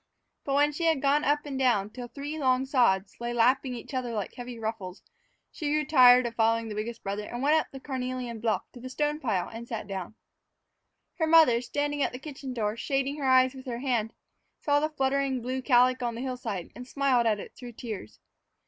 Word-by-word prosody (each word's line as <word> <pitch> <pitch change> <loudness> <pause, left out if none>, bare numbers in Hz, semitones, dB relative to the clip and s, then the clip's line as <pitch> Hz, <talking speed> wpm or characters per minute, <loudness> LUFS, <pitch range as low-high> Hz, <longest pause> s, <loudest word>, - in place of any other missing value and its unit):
But 275 - 0
when 290 +1 +4
she 330 +3 -3
had 320 -3 +3
gone 285 +2 +2
up 295 +1 +1
and 275 -2 -4
down 215 -6 +2
till 245 +1 -7
three 290 +5 -6
long 260 -1 +2
sods 225 -8 +2
lay 240 0 -3
lapping 250 +2 +2
each 235 - -9
other 250 -2 -2
like 210 -3 -3
heavy 245 -1 -8
ruffles, 220 -4 -5 0.5
she 300 - -4
grew 305 0 +1
tired 250 -3 +7
of 235 - -3
following 225 0 +1
the - - -4
biggest 225 +2 -5
brother 200 +1 -3
and 240 +4 -5
went 295 +2 +4
up - - -4
the 270 - -8
carnelian 255 -3 -4
bluff 220 -1 0
to 245 - -11
the 255 +2 -8
stone 295 +3 -1
pile 210 - -1
and 230 +1 -9
sat 225 -3 -5
down. 195 0 -6 1.0
Her 320 - +2
mother, 315 -8 +6
standing 290 +3 -2
at - - 0
the - - -5
kitchen 270 -1 -8
door, 215 -3 -1
shading 275 +3 -1
her 280 -3 -2
eyes 260 0 +5
with 260 0 -11
her 240 -2 -3
hand, 240 -4 -1 0.5
saw 290 -1 +2
the 305 +1 0
fluttering 270 -2 0
blue 255 +2 -3
calico 255 -1 +3
on 235 - -4
the 235 - -5
hillside 245 -8 -4
and 250 0 -9
smiled 260 -4 +2
at 210 -2 +1
it - - -9
through 245 -1 -10
tears. 210 - -7
255 Hz, 215 wpm, -28 LUFS, 230-275 Hz, 1.0 s, tired